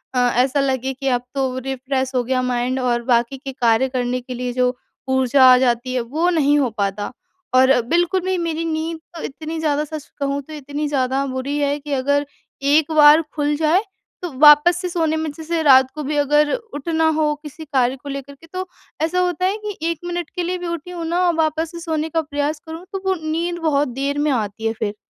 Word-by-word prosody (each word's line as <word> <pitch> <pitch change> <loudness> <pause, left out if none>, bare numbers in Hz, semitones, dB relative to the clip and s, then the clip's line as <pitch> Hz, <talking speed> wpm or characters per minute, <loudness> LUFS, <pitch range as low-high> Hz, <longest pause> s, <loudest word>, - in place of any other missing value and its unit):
अ, - - +3 0.2
ऐसा 265 +3 +2
लगे 265 -1 0
कि 270 +1 -5
अब 245 -1 +1
तो 260 -1 -1
रिफ्रेश 265 0 -2
हो 245 - +2
गया 255 +1 0
माइंड 250 +2 -1
और 240 -1 0
बाकी 240 +2 +1
के 270 0 -7
कार्य 240 +1 +2
करने 250 -1 -2
के 250 +1 -7
लिए 245 0 -3
जो 250 0 +1 0.3
ऊर्जा 260 0 +4
आ - - +6
जाती 250 0 0
है 250 - 0
वो 310 +9 0
नहीं 295 -4 +3
हो 260 -4 +1
पाता। 200 +2 -2 0.4
और 260 +1 +6 0.2
बिल्कुल 350 +4 +2
भी 375 -1 0
मेरी 330 -1 -2
नींद 320 0 -3 0.2
तो 325 - -6
इतनी 315 +3 -5
ज़्यादा 300 -1 0
सच 305 -1 -7
कहूँ 280 0 -1
तो 310 - -11
इतनी 290 +1 -4
ज़्यादा 270 -1 0
बुरी 270 +2 -3
है 285 0 +1
कि 290 0 -9
अगर, 285 +2 +1 0.4
एक 295 +3 +3
बार 305 +1 +7
खुल 295 0 0
जाए 320 +5 +3 0.4
तो 350 -3 -4
वापस 300 +3 +7
से 360 - -3
सोने 325 -3 0
में 315 -1 -2
जैसे 320 +2 -3
रात 265 -2 +6
को 305 - -4
भी 295 +1 -2
अगर 295 +1 +3
उठना 320 - -2
हो 300 -1 +2
किसी 305 +2 -9
कार्य 260 -2 +1
को 285 - -7
लेकर 275 0 -6
के 330 +4 -18
तो 370 0 -4 0.4
ऐसा 355 +3 +1
होता 360 0 0
है 395 +3 +1
कि 415 -2 -4
1 330 - -5
मिनट 350 -2 -3
के 355 - -1
लिए 365 +1 -2
भी 355 -1 -5
उठी 340 +1 -5
हूँ 340 -2 -5
ना 345 +2 0
और 345 - +3
वापस 320 +1 0
से 340 - -8
सोने 320 -1 -2
का 325 +1 0
प्रयास 290 0 -2
करूँ 325 +3 -8
तो 385 - -3
वो 380 0 +2 0.2
नींद 345 +2 -2
बहुत 295 -3 +2
देर 280 +1 -1
में 300 0 +1
आती 220 -3 -2
है 225 - 0
फिर। 205 -1 -1
290 Hz, 220 wpm, -20 LUFS, 260-320 Hz, 0.4 s, बार